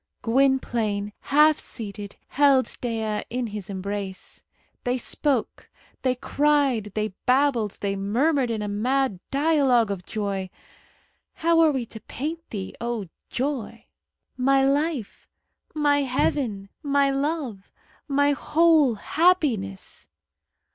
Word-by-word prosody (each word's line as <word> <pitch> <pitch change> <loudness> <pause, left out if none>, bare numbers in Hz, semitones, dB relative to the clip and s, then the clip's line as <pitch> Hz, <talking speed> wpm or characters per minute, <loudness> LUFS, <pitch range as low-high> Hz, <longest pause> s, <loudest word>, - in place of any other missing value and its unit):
Gwynplaine, 230 -5 +1
half 300 +2 +4
seated, 205 -3 -7
held 275 -2 +3
Dea 220 -3 -2
in 250 +1 -2
his 210 -3 -6
embrace. 195 0 -5 0.4
They 250 +1 0
spoke, 260 0 -2 0.3
they 255 -1 +1
cried, 275 -6 +1
they 215 0 0 0.2
babbled, 250 -5 +2
they 200 -1 -1
murmured 245 +7 +1
in 220 -2 -2
a - - -3
mad 235 +1 0
dialogue 275 -6 +3
of 190 -2 -4
joy! 195 -2 -3 0.8
How 335 -1 +2
are 325 -1 +6
we 260 -4 -2
to 220 - -9
paint 320 +9 -6
thee, 195 -3 -5
O 235 -6 -3 0.2
joy! 245 -4 -3 0.5
"My 270 +1 +3
life!" 285 -4 -1 0.5
"My 290 -1 +3
heaven!" 250 -6 -1
"My 280 -2 +2
love!" 275 -8 -3 0.4
"My 285 0 +3
whole 305 -3 +3
happiness!" 260 - 0
250 Hz, 115 wpm, -25 LUFS, 210-285 Hz, 0.8 s, are